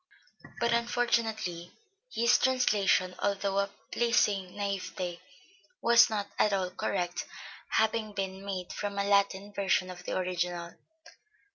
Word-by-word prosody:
but 235 0 +2
unfortunately 225 -7 0 0.4
his 235 +1 +4
translation, 210 -8 +2
although 200 -1 0
of 200 0 0
a 200 - -30
pleasing 210 -6 +2
naïveté, 185 -3 -3 0.6
was 235 0 +6
not 210 -2 -2
at 210 - +4
all 190 -2 0
correct, 180 -2 -2 0.5
having 220 -1 +1
been 195 -1 -4
made 190 -3 -4
from 205 -1 -4
a 200 - +1
Latin 200 0 +1
version 190 -2 +1
of 180 -1 -10
the - - -2
original. 175 -2 -2
200 Hz, 125 wpm, -30 LUFS, 185-215 Hz, 0.6 s, was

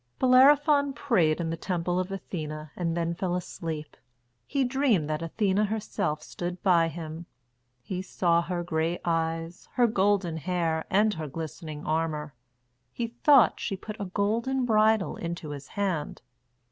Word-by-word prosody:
Bellerophon 280 +2 +5
prayed 180 - +2
in 165 -1 -2
the - - -1
temple 175 +1 -1
of 185 +1 -3
Athene 155 -5 -5
and 170 -1 -1
then 170 0 0
fell 180 +1 -2
asleep. 160 -3 -5 0.5
He 275 -1 +1
dreamed 250 - +2
that 155 - -2
Athene 190 +4 0
herself 205 -8 -1
stood 175 0 -6
by 170 -4 +4
him. 160 +1 -7 0.6
He 185 -2 -4
saw 170 -2 +1
her 175 0 -3
grey 165 0 -1
eyes, 165 0 -2
her 245 - +4
golden 195 -6 +1
hair, 165 0 -1
and 210 +2 +3
her 160 -3 -5
glistening 155 +1 -7
armour. 155 -2 -1 0.6
He 235 - -3
thought 250 +2 +5
she 195 - -3
put 215 +3 -8
a - - -2
golden 230 +7 0
bridle 215 -3 +3
into 170 -2 -5
his 145 0 -7
hand. 190 -7 -3
175 Hz, 145 wpm, -27 LUFS, 160-215 Hz, 0.6 s, Bellerophon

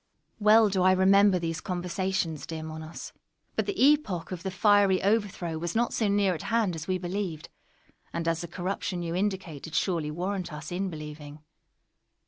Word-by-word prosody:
_ - - -28
Well 215 +1 +6
do 190 -1 0
I 185 +1 +5
remember 195 +1 +5
these 165 -1 -3
conversations, 180 -3 -2
dear 160 -1 -5
Monos; 160 +1 -8 0.4
but - - 0
the 405 -2 -3
epoch 275 - +2
of 180 -2 -5
the 190 - -3
fiery 200 0 +4
overthrow 195 -6 0
was 170 +3 -3
not 235 +1 +1
so 220 - +1
near 200 -2 +2
at 160 - -5
hand 225 -5 +2
as 160 0 -7
we 185 -1 +1
believed, 180 -3 -4 0.6
and 170 0 -3
as 165 -1 +1
the 170 - -5
corruption 180 +1 -3
you 165 0 -3
indicate 185 -6 -2
did 160 - -8
surely 165 -5 0
warrant 180 +3 -3
us 150 +1 -7
in 190 +2 -1
believing. 150 -2 -9
180 Hz, 180 wpm, -28 LUFS, 165-200 Hz, 0.6 s, Well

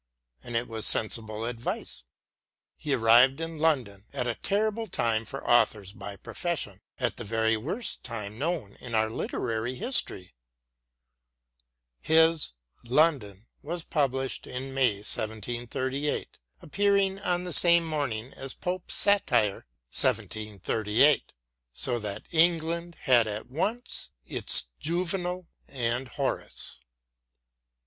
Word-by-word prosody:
And 120 - -7
it 115 +1 0
was 110 -1 -3
sensible 110 0 -1
advice. 115 - -4 0.7
He 145 -3 -1
arrived 120 +4 +6
in 165 -1 -5
London 125 -11 0
at 125 - -1
a 120 - 0
terrible 215 - -1
time 115 - 0
for 135 +5 -5
authors^ 110 -4 +2
by 100 - -7
profession 105 - -4
— - - -34
at 125 -2 -1
the - - -6
very 110 +1 +1
worst 175 - -2
time 110 -2 -6
known 150 - -2
in 120 -3 -4
our 110 0 +2
literary 115 +1 -2
history* 125 - 0 1.7
His 160 - +4 0.2
" - - -44
London 120 - +2
" - - -41
was 170 +2 -4
published 135 -4 -1
in 130 +1 -5
May 130 -5 +3
1738, 120 +6 -2 0.2
appearing 200 +2 +2
on 180 -3 0
the 180 -2 -4
same 170 +3 +6
morning 135 -7 -2
as 135 -1 -6
Pope's 180 0 -3
satire 120 - +2 0.2
"1738," 110 +5 +1 0.4
"so 120 -2 0
that 105 -2 -5
England 170 +1 +2
had 120 -5 +5
at 110 +3 -4
once 220 - -1 0.2
its - - +2
Juvenal 180 +2 0 0.2
and 120 0 -2
Horace." - - -2
130 Hz, 120 wpm, -28 LUFS, 110-165 Hz, 1.7 s, arrived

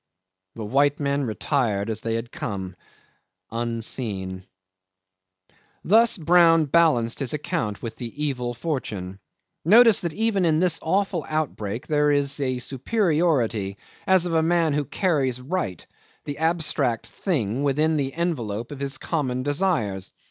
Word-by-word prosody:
The 110 - -5
white 140 +6 +2
men 140 -1 0
retired 110 -3 -1
as 110 0 -3
they 115 -1 -2
had 115 +1 -4
come 95 -3 -5 0.8
unseen. 110 -5 -3 1.4
'Thus 225 +4 +4
Brown 165 -1 +5
balanced 145 -7 +2
his 135 0 0
account 105 -8 -3
with 115 -1 -6
the 125 +5 -5
evil 125 -4 -2
fortune. 105 - -4 0.4
Notice 225 +4 +6
that 170 -3 -3
even 220 -3 +1
in 160 -2 +3
this 175 -2 +2
awful 185 0 0
outbreak 125 -8 -3
there 150 -1 +2
is 145 0 +1
a 130 -2 0
superiority 135 - 0 0.3
as 190 -2 +4
of 175 - -2
a 160 - +3
man 165 -1 +2
who 145 0 0
carries 140 - 0
right 130 - -3 0.4
the 145 -1 -5
abstract 155 -7 0
thing 130 - -2
within 150 +3 +2
the 135 -2 -2
envelope 120 -10 -2
of 145 - -7
his 140 -1 -1
common 130 -5 -2
desires. 140 - -1
140 Hz, 135 wpm, -24 LUFS, 115-165 Hz, 1.4 s, Notice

